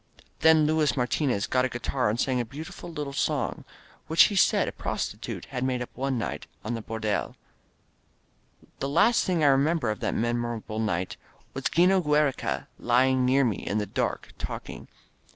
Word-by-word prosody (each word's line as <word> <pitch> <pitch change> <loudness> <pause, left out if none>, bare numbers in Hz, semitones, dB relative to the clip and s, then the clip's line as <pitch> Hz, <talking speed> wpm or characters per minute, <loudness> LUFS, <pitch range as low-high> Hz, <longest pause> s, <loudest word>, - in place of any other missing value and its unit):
Then 160 -1 +5
Luis 155 -1 +2
Martinez 125 -3 0
got 125 0 +1
a 130 - +1
guitar 120 0 -1
and 110 +3 -1
sang 130 -1 +1
a - - +1
beauti 150 +8 -8
ful - - -9
little 150 -3 -4
love 140 - -3
song, - - -1 0.4
which 160 +1 +6
he 205 - +1
said 190 - +4
a - - -2
prostitute - - -4
had 125 - -2
made 130 -1 0
up 125 - -6
one 135 0 -2
night 115 - -4 0.2
in 120 +2 -2
a 115 - -5
hordeh 110 -2 -2 1.4
The 135 - -2
last 225 +11 +4
thing 175 -4 +1
I - - +6
remember 140 -2 +2
of 105 - -5
that - - -1
memorable 120 -2 -2
night 90 -5 -1 0.4
was - - -6
'Gino 185 +2 +4
Giiereca 150 -3 +1
lying 130 +1 +3
near 135 +2 +4
me 110 -7 0
in 100 - -3
the 105 - 0
dark, 95 - -2
talking. - - -6
130 Hz, 180 wpm, -27 LUFS, 120-150 Hz, 1.4 s, which